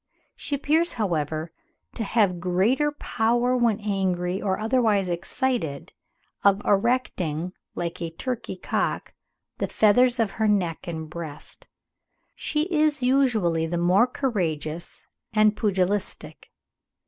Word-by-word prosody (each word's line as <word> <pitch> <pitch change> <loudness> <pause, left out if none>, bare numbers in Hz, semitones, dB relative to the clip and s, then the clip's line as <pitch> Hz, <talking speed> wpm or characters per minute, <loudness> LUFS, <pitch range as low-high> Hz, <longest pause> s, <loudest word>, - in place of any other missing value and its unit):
She 290 - -3
appears, 315 +5 +1
however, 160 - -2 0.4
"to 230 - -3
have 200 -5 +1
greater 200 - +2
power, 240 -2 0
when 235 -4 +2
angry 190 -3 -1
or 190 -3 0
otherwise 220 -4 +2
excited, 175 - -2 0.5
of 200 0 +5
erecting, 190 -7 0 0.2
like 170 0 -4
a 170 - -2
turkey 245 +9 -4
cock, - - -2 0.5
the - - 0
feathers 245 +4 +4
of 220 -3 +1
her 220 +1 0
neck 180 -6 0
and 160 -2 -5
breast. 155 -2 -9 0.7
She 300 0 -1
is 305 -3 +2
usually 220 -12 +2
the 170 +1 -2
more 180 +7 +4
courageous 175 - -3 0.3
and 215 0 +4
pugilistic. 200 -2 -2
205 Hz, 115 wpm, -25 LUFS, 175-245 Hz, 0.7 s, of